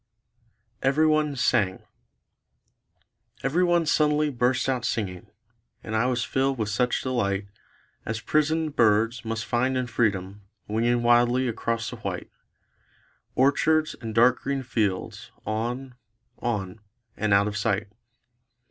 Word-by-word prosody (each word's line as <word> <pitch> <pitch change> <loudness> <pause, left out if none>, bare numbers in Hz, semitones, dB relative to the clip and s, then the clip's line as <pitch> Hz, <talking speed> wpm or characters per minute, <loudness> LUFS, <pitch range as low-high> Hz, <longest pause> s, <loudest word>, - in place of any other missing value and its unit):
EVERYONE 150 +1 +2
SANG 100 -7 +1 1.6
Everyone 170 +4 +2
suddenly 150 -1 +2
burst 125 0 +1
out 130 -3 0
singing; 95 -7 -3 0.5
And 110 - -4
I 110 +3 +2
was 125 -2 0
filled 135 0 0
with 110 -2 -2
such 125 +4 0
delight 100 -6 -1 0.6
As 110 +1 -3
prisoned 155 +1 0
birds 115 +1 +3
must 115 0 -3
find 130 +2 0
in 125 - 0
freedom 105 -4 -1 0.3
Winging 120 +3 +1
wildly 120 +2 +4
across 115 -1 -2
the - - -7
white - - -5 1.0
Orchards 155 +4 +3
and 110 -2 -6
dark 120 +2 +5
green 135 -1 -2
fields; 105 -6 -2 0.2
on; 120 +4 -3 0.5
on; 105 -4 -3 0.4
and 110 -1 -1
out 100 +1 +4
of 105 - -4
sight. 105 0 0
120 Hz, 120 wpm, -25 LUFS, 110-135 Hz, 1.6 s, dark